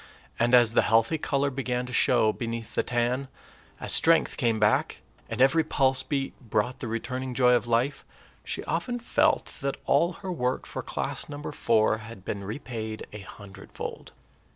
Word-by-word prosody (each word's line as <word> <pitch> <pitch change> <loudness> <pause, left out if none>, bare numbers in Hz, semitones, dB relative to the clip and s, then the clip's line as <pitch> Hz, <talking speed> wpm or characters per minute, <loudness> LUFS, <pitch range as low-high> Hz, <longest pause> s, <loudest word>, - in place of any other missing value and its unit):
And 120 +2 +4
as 120 -2 +6
the - - +5
healthy 115 +8 +2
color 140 -1 0
began 125 -2 -2
to 125 - -8
show 110 -2 +3
beneath 115 -1 -5
the - - +2
tan, 120 +3 -1 0.5
as - - -2
strength 165 0 +4
came 115 -5 +1
back, 105 0 +1 0.3
and 115 - -4
every 135 +5 +5
pulse 135 -3 +2
beat 135 0 -2
brought 120 +1 -1
the 125 - -4
returning 125 +3 -4
joy 125 -1 +5
of 120 -1 +1
life, 120 +5 0 0.4
she - - -4
often 245 -1 -2
felt 295 +6 +1
that 140 0 -2
all 170 +6 +3
her 185 - -2
work 125 -6 -1
for - - -5
class - - -3
number 145 0 -6
four 110 -1 +2
had 110 -3 -11
been 100 -1 -4
repaid 110 0 -5
a 105 - -7
hundredfold. 95 0 -9
125 Hz, 170 wpm, -27 LUFS, 115-135 Hz, 0.5 s, as